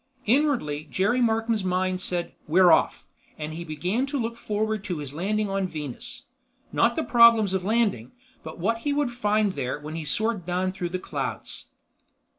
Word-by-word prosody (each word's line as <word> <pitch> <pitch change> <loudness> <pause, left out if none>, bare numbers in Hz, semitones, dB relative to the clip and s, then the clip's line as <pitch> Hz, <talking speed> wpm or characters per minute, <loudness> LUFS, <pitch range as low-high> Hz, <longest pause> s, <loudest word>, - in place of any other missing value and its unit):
Inwardly, 235 - +1
Jerry 205 - +1
Markham's 225 -2 +1
mind 185 0 0
said, 175 -2 -2
"We're 175 +3 +6
off!" 160 - +2 0.3
and 155 0 -5
he 170 +2 -5
began 180 - -1
to 285 +1 -2
look 230 0 -2
forward 215 -1 -2
to 180 - -3
his 145 -2 -6
landing 210 +6 -1
on 195 -1 -1
Venus. 150 -7 -7 0.5
Not - - +2
the 320 - 0
problems 230 -4 +6
of 190 -1 0
landing, 205 - 0 0.3
but 160 - -8
what 225 +7 0
he 285 +4 -1
would 285 -3 0
find 215 -3 +1
there 135 -4 -3
when 150 +1 -7
he 165 -2 -5
soared 215 +5 0
down 180 +2 -1
through 180 -2 -4
the 185 - -2
clouds. - - -5
190 Hz, 175 wpm, -25 LUFS, 170-225 Hz, 0.5 s, We're